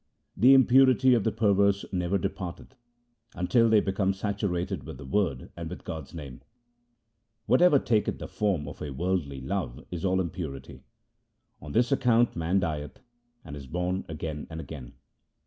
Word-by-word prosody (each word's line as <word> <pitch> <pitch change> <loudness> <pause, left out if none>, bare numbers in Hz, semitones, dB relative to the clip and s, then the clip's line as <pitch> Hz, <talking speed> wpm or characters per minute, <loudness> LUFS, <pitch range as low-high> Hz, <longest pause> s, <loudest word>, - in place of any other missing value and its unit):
The 130 +3 +7
impurity 130 0 +5
of 115 -4 +2
the 110 - +1
perverse 100 -2 +2
never 90 +1 0
departeth 95 +4 -5 0.6
Until 115 +6 +3
they 110 -1 +6
become 95 0 0
saturated 95 -2 -2
with - - -9
the - - -10
Word 75 -4 -1
and - - -6
with - - -8
God's 80 -4 -7
name. 70 -6 -9 1.0
Whatever 150 +3 +5
taketh 110 -5 0
the - - -7
form 95 -9 -1
of 75 - -9
worldly 75 -1 -2
love 75 -3 -4
is 85 -2 -5
all 95 0 +2
impurity: 80 -7 -5 0.8
On 75 0 -8
this 120 +2 +2
account 120 -3 +3
man 85 +3 +1
dieth 75 -5 -4 0.5
and 75 -2 -8
is 70 -2 -9
born 90 +4 -2
again 80 -1 -5
and 80 0 -7
again. 70 -6 -9
95 Hz, 150 wpm, -27 LUFS, 80-105 Hz, 1.0 s, The